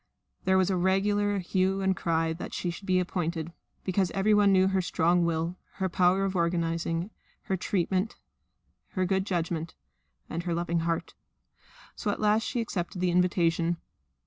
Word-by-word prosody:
There 190 Hz, 0 st, +4 dB
was 190 Hz, 0 st, +3 dB
a -, -, +1 dB
regular 205 Hz, +3 st, +2 dB
hue 190 Hz, +1 st, 0 dB
and 190 Hz, 0 st, +2 dB
cry 165 Hz, -2 st, 0 dB
that 165 Hz, -, -7 dB
she 175 Hz, -, -2 dB
should 195 Hz, +4 st, -10 dB
be 185 Hz, -1 st, +3 dB
appointed, 170 Hz, -2 st, -2 dB, 0.3 s
because 185 Hz, -1 st, +1 dB
everyone 205 Hz, 0 st, +4 dB
knew 190 Hz, 0 st, +5 dB
her 190 Hz, -1 st, +1 dB
strong 175 Hz, 0 st, +2 dB
will, 165 Hz, +2 st, -1 dB, 0.2 s
her 190 Hz, -1 st, -2 dB
power 185 Hz, +2 st, +3 dB
of 195 Hz, 0 st, -2 dB
organising, 170 Hz, +1 st, 0 dB, 0.3 s
her 190 Hz, -, -1 dB
just 180 Hz, -, -6 dB
treatment, 190 Hz, +2 st, 0 dB, 0.8 s
her 185 Hz, -1 st, +1 dB
good 190 Hz, +1 st, 0 dB
judgment, 170 Hz, -3 st, -2 dB, 0.5 s
and 165 Hz, -, -3 dB
her 170 Hz, -1 st, -2 dB
loving 170 Hz, 0 st, 0 dB
heart. 165 Hz, 0 st, -2 dB, 0.8 s
So -, -, -3 dB
at 205 Hz, -, -1 dB
last 215 Hz, +1 st, +3 dB
she 235 Hz, +1 st, -2 dB
accepted 185 Hz, -3 st, -3 dB
the 180 Hz, 0 st, +1 dB
invitation. 175 Hz, -1 st, +2 dB
180 Hz, 165 wpm, -28 LUFS, 170-195 Hz, 0.8 s, knew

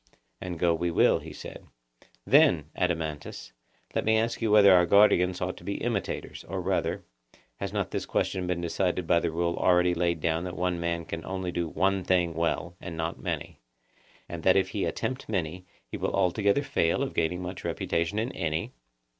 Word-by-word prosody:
And 90 Hz, -2 st, -5 dB
go 85 Hz, 0 st, +3 dB
we 85 Hz, +1 st, -1 dB
will, 85 Hz, -, +4 dB
he -, -, -10 dB
said. -, -, -9 dB, 0.6 s
Then, 125 Hz, -, +4 dB
Adeimantus, 80 Hz, -7 st, -3 dB, 0.4 s
let -, -, 0 dB
me 110 Hz, 0 st, +3 dB
ask 115 Hz, +2 st, -1 dB
you 115 Hz, -, +1 dB
whether 105 Hz, -2 st, +7 dB
our 90 Hz, -1 st, +5 dB
guardians 90 Hz, -3 st, +4 dB
ought 90 Hz, +1 st, -2 dB
to -, -, -13 dB
be 100 Hz, +2 st, -3 dB
imitators; -, -, -3 dB
or -, -, -3 dB
rather, -, -, -1 dB, 0.5 s
has -, -, -4 dB
not -, -, -2 dB
this -, -, -3 dB
question 90 Hz, -1 st, -1 dB
been 90 Hz, -1 st, -1 dB
decided 90 Hz, +1 st, -1 dB
by 85 Hz, +1 st, +4 dB
the -, -, -1 dB
rule 85 Hz, +1 st, -1 dB
already 90 Hz, -1 st, +3 dB
laid 85 Hz, -1 st, 0 dB
down 80 Hz, +2 st, 0 dB
that 90 Hz, -1 st, -6 dB
one 90 Hz, -1 st, -1 dB
man 85 Hz, 0 st, -2 dB
can 85 Hz, 0 st, -6 dB
only 95 Hz, 0 st, -4 dB
do 85 Hz, -1 st, -2 dB
one 95 Hz, +3 st, 0 dB
thing 90 Hz, -2 st, +2 dB
well, 85 Hz, +2 st, -1 dB
and 85 Hz, -2 st, -7 dB
not 80 Hz, 0 st, -3 dB
many; -, -, -4 dB, 0.7 s
and 85 Hz, -1 st, -6 dB
that 95 Hz, +3 st, +4 dB
if 95 Hz, -, +2 dB
he -, -, -2 dB
attempt 130 Hz, -2 st, -3 dB
many, 90 Hz, -3 st, -3 dB, 0.2 s
he -, -, -7 dB
will -, -, -2 dB
altogether 100 Hz, +8 st, +2 dB
fail 85 Hz, 0 st, +1 dB
of 135 Hz, -, -4 dB
gaining 90 Hz, +2 st, -1 dB
much 90 Hz, 0 st, -6 dB
reputation 85 Hz, +5 st, -1 dB
in 115 Hz, +4 st, -1 dB
any? 80 Hz, -2 st, -3 dB
90 Hz, 190 wpm, -28 LUFS, 85-95 Hz, 0.7 s, whether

